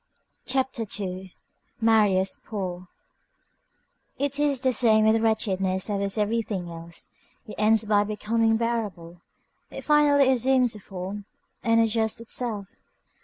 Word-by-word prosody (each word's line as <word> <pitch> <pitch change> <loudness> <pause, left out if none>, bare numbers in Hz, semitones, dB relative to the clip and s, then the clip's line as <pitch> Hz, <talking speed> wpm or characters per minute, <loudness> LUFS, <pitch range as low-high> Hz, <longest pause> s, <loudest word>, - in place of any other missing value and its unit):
CHAPTER 265 -2 0 0.2
II—MARIUS 190 +1 -1
POOR 185 -4 -5 1.3
It 280 0 -1
is 285 -3 +1
the 260 -1 +2
same 220 -3 +4
with 220 +1 +3
wretchedness 195 -3 0
as 200 - -1
with 200 +1 -1
everything 210 -4 -2
else. 165 0 -7 0.4
It 215 - -9
ends 220 +1 +3
by 205 -1 +3
becoming 225 +2 0
bearable. 205 -8 -4 0.5
It - - -8
finally 290 -3 +4
assumes 255 -1 +2
a 210 - -9
form, 195 +1 -7 0.4
and 230 0 +3
adjusts 225 -1 +1
itself. 225 -3 -3
220 Hz, 120 wpm, -25 LUFS, 195-235 Hz, 1.3 s, same